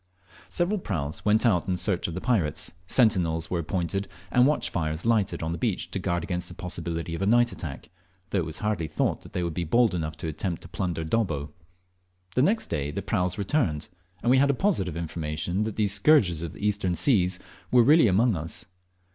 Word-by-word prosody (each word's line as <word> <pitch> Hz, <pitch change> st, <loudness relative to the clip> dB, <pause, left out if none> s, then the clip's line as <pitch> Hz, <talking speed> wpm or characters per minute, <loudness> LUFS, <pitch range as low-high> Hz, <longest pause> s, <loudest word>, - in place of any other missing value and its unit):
Several 185 Hz, +4 st, 0 dB
praus 80 Hz, -, -3 dB
went 110 Hz, +3 st, +3 dB
out 95 Hz, -8 st, +2 dB
in 90 Hz, -1 st, 0 dB
search 95 Hz, -1 st, 0 dB
of 85 Hz, -, -5 dB
the 90 Hz, -, -4 dB
pirates, 95 Hz, -, 0 dB, 0.2 s
sentinels 90 Hz, -9 st, +2 dB
were 90 Hz, -, 0 dB
appointed, 90 Hz, +3 st, -2 dB, 0.2 s
and 125 Hz, +1 st, +5 dB
watch 150 Hz, -, +1 dB
fires 80 Hz, 0 st, -2 dB
lighted 110 Hz, -7 st, +1 dB
on 80 Hz, -, -2 dB
the 85 Hz, -, -4 dB
beach -, -, -1 dB
to -, -, -2 dB
guard 85 Hz, -1 st, -1 dB
against 90 Hz, +1 st, -3 dB
the -, -, -8 dB
possibility 85 Hz, -1 st, -4 dB
of 85 Hz, -, -4 dB
a 100 Hz, -, +1 dB
night 120 Hz, +2 st, +4 dB
attack, 80 Hz, +2 st, -7 dB, 0.4 s
though 100 Hz, -, +1 dB
it -, -, 0 dB
was 80 Hz, -, -3 dB
hardly 100 Hz, -7 st, 0 dB
thought -, -, -2 dB
they 90 Hz, -, -1 dB
would 85 Hz, -2 st, -2 dB
be 85 Hz, -, -2 dB
bold 115 Hz, +7 st, +3 dB
enough 80 Hz, -2 st, -3 dB
to 80 Hz, -, -5 dB
attempt 80 Hz, +3 st, -3 dB
to -, -, -10 dB
plunder 85 Hz, -2 st, -3 dB
Dobbo. 80 Hz, -6 st, -1 dB, 0.8 s
The 125 Hz, -, +2 dB
next 215 Hz, -, +2 dB
day 75 Hz, -3 st, -2 dB
the 75 Hz, -, -4 dB
praus 90 Hz, 0 st, 0 dB
returned, 100 Hz, -, 0 dB, 0.3 s
and 120 Hz, -, +3 dB
we 130 Hz, -, +6 dB
had 140 Hz, -1 st, +3 dB
positive 95 Hz, -, 0 dB
information 80 Hz, +3 st, -2 dB
that 110 Hz, -, -4 dB
these 105 Hz, -2 st, +2 dB
scourges 100 Hz, -, +4 dB
of 85 Hz, -3 st, -5 dB
the 105 Hz, -, -5 dB
Eastern 100 Hz, -4 st, 0 dB
seas 95 Hz, -7 st, +2 dB, 0.3 s
were 125 Hz, -1 st, +6 dB
really 150 Hz, +1 st, +6 dB
among 105 Hz, +3 st, +3 dB
us. 80 Hz, 0 st, -4 dB
90 Hz, 205 wpm, -26 LUFS, 80-110 Hz, 0.8 s, we